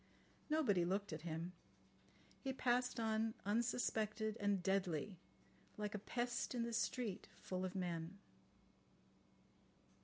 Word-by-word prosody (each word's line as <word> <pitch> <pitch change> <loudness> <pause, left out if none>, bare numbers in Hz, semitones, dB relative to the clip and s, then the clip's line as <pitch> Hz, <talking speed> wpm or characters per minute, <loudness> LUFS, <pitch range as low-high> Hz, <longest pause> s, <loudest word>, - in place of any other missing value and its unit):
Nobody 260 - +4
looked 195 +1 0
at 155 - -4
him. 165 +1 -3 0.9
He 265 -1 -2
passed 250 -1 +2
on 220 0 +1
unsuspected 220 -1 +1
and 200 -3 +2
deadly, 185 -1 +1 0.6
like 210 -1 -2
a 210 - -1
pest 240 +4 -1
in 235 - +1
the 235 0 -2
street 230 -2 0
full 185 0 -3
of 185 0 -2
men. 175 0 -2
210 Hz, 115 wpm, -41 LUFS, 185-235 Hz, 0.9 s, Nobody